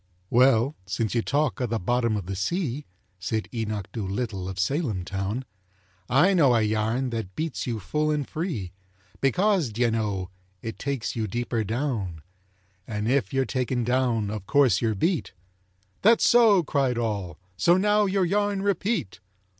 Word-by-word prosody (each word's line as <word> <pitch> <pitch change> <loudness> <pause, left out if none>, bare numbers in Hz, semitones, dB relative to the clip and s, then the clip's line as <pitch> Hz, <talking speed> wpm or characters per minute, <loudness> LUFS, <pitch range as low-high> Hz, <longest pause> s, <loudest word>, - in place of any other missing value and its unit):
"Well—since 115 -4 +2
you 120 - +2
talk 145 +1 0
o' 125 - +1
the 115 0 -1
bottom 115 +2 0
of 100 - -5
the 95 +1 -4
sea," 145 - -2 0.3
Said 110 +4 -2
Enoch 110 -4 -3
Doolittle 100 -2 -3
of 95 - -6
Salem 105 - -1
town, 100 +7 -3 0.6
"I 175 +10 +5
know 140 -9 +5
a 115 - +3
yarn 110 +4 0
that 110 -5 -4
beats 160 -5 -3
you 115 -3 -2
full 150 +10 -1
and 150 -2 -1
free, 155 - -4 0.5
Because, 180 - +2
d'ye 120 +2 +1
know, 100 -5 -2 0.3
it 115 -1 -6
takes 140 -4 -3
you 110 -2 -1
deeper 120 +1 -2
down, 105 - -3 0.6
And 105 -1 -3
if 135 +3 +1
you're 135 0 +1
taken 125 0 -1
down—of 115 -5 0
course 135 -9 +4
you're 110 -2 +1
beat." 165 - 0 0.7
"That's 225 +3 +5
so," 225 -6 +6
cried 135 -5 0
all, 100 -8 -2 0.2
"so 175 - +4
now 210 +2 +3
your 190 -1 +1
yarn 200 +1 0
repeat!" 200 - -1
120 Hz, 155 wpm, -26 LUFS, 105-150 Hz, 0.7 s, so